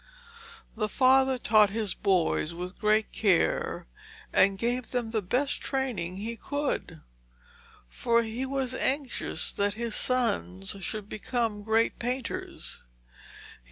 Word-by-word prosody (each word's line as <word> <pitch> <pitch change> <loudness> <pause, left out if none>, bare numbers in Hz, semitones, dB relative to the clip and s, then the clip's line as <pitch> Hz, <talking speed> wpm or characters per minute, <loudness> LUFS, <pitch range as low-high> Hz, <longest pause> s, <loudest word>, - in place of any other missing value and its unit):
The 215 -1 -1
father 265 +2 +4
taught 215 -3 +5
his 210 -2 -2
boys 175 -4 +1
with 180 +2 -6
great 215 0 +2
care, 195 -6 +1 0.5
and 195 0 +4
gave 240 +3 -1
them 240 -3 -2
the 220 -2 0
best 255 +9 0
training 245 -10 -2
he 225 +4 -4
could, 270 - -3 0.9
for 235 - +1
he 225 +3 -4
was 265 -1 -2
anxious 270 0 +1
that 200 0 0
his 230 0 -3
sons 205 -7 0
should 205 +2 -3
become 225 -1 -2
great 220 +2 +1
painters. 245 +1 -4
225 Hz, 120 wpm, -28 LUFS, 200-255 Hz, 0.9 s, taught